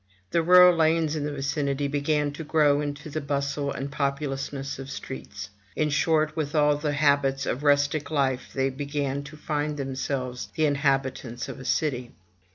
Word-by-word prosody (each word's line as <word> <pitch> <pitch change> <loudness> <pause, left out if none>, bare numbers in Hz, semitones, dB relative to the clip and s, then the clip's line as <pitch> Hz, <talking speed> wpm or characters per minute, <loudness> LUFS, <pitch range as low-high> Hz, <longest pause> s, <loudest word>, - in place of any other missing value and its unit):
The 170 - +3
rural 180 +1 +7
lanes 160 -1 +2
in 150 -2 -2
the 150 - -2
vicinity 140 0 -1
began 145 +1 0
to 145 +3 -7
grow 150 -2 +3
into 145 +1 -5
the 155 +1 -4
bustle 140 0 -1
and 140 +1 -5
populousness 140 -1 -3
of 135 0 -7
streets; 100 -8 -7 0.2
in 150 - +1
short, 155 +1 +2
with 155 -2 -2
all 150 -1 +4
the 150 0 -2
habits 140 -2 +2
of 125 - -2
rustic 145 +1 +2
life 135 -4 0
they 135 0 0
began 140 0 -2
to 150 +2 -11
find 150 -1 -2
themselves 130 -2 -3
the 155 - +2
inhabitants 135 -4 0
of - - -7
a 130 - -9
city. 125 -2 -1
145 Hz, 165 wpm, -26 LUFS, 135-150 Hz, 0.2 s, rural